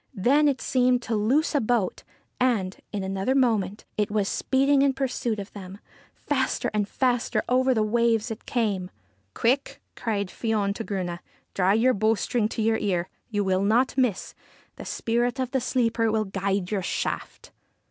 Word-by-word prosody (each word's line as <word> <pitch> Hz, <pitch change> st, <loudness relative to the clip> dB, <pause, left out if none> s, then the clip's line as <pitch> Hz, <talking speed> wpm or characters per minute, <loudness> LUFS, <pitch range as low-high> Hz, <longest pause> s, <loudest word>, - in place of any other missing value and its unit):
Then 275 Hz, +9 st, +3 dB
it 275 Hz, -2 st, 0 dB
seemed 250 Hz, -1 st, +2 dB
to 230 Hz, -, -2 dB
loose 250 Hz, +11 st, +2 dB
a 290 Hz, -, +2 dB
boat, 225 Hz, -4 st, 0 dB, 0.4 s
and, 220 Hz, -7 st, +1 dB, 0.2 s
in 205 Hz, -2 st, -3 dB
another 195 Hz, +7 st, -1 dB
moment, 220 Hz, -7 st, +1 dB
it 210 Hz, -1 st, +1 dB
was 205 Hz, -1 st, 0 dB
speeding 275 Hz, +4 st, +2 dB
in 275 Hz, -1 st, +3 dB
pursuit 250 Hz, -4 st, -1 dB
of 200 Hz, -1 st, -7 dB
them. 195 Hz, -1 st, -9 dB, 0.4 s
Faster -, -, -1 dB
and 210 Hz, -1 st, 0 dB
faster 245 Hz, -2 st, 0 dB
over 255 Hz, +1 st, +3 dB
the 220 Hz, -, +2 dB
waves 230 Hz, +1 st, +1 dB
it 225 Hz, -, -8 dB
came. 200 Hz, -6 st, -1 dB, 0.2 s
' 100 Hz, 0 st, -42 dB
Quick! 260 Hz, +4 st, 0 dB
' -, -, -49 dB
cried 205 Hz, -4 st, -2 dB
Fion 210 Hz, -3 st, -1 dB
to 225 Hz, -, -5 dB
Grunne. 180 Hz, -5 st, -3 dB, 0.2 s
' -, -, -40 dB
Draw 190 Hz, +1 st, +3 dB
your 245 Hz, +4 st, +4 dB
bowstring 215 Hz, +1 st, +1 dB
to 225 Hz, -, -2 dB
your 220 Hz, 0 st, +2 dB
ear. 185 Hz, -5 st, -1 dB, 0.2 s
You 205 Hz, -2 st, 0 dB
will 190 Hz, -1 st, +1 dB
not 230 Hz, +6 st, +2 dB
miss: 250 Hz, -7 st, 0 dB, 0.4 s
the -, -, -9 dB
spirit 240 Hz, +1 st, -1 dB
of 255 Hz, -1 st, -2 dB
the 265 Hz, -, 0 dB
sleeper 230 Hz, -2 st, +1 dB
will 215 Hz, 0 st, +1 dB
guide 195 Hz, -1 st, -2 dB
your 205 Hz, -2 st, 0 dB
shaft.' -, -, -4 dB
220 Hz, 180 wpm, -25 LUFS, 200-250 Hz, 0.4 s, your